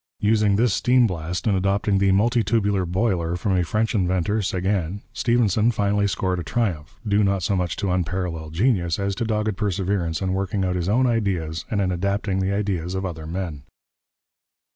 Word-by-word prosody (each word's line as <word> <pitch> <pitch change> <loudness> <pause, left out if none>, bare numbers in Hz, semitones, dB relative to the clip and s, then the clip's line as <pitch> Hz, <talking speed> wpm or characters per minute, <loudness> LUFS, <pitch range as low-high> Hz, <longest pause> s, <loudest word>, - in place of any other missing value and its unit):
Using 105 -1 +3
this 115 0 +2
steam 125 +3 +4
blast, 90 -2 -3
and 105 -4 +2
adopting 100 +1 +1
the 100 0 +3
multitubular 105 -2 +2
boiler 90 -3 0
from 95 +2 0
a 90 - +2
French 110 +7 0
inventor, 95 +1 +1
Seguin, 95 -1 -1
Stephenson 115 -2 +2
finally 100 -2 +1
scored 95 -2 -1
a - - -4
triumph, 90 -12 -2
due 105 +1 +3
not 100 -2 +1
so 100 - +1
much 90 -3 -1
to 100 -3 -2
unparalleled 85 -3 -2
genius 90 -5 +1
as 100 0 -1
to 115 - -2
dogged 105 -2 -1
perseverance 95 -4 -1
in 95 -1 -1
working 95 0 -1
out 90 0 -1
his 90 0 -1
own 125 +5 +3
ideas 90 -8 -1
and 105 - -1
in 95 -1 0
adapting 100 +2 -1
the 95 +1 0
ideas 95 -3 -2
of 95 +1 -2
other 80 -4 -6
men. 85 -4 -4
95 Hz, 180 wpm, -23 LUFS, 90-105 Hz, -, steam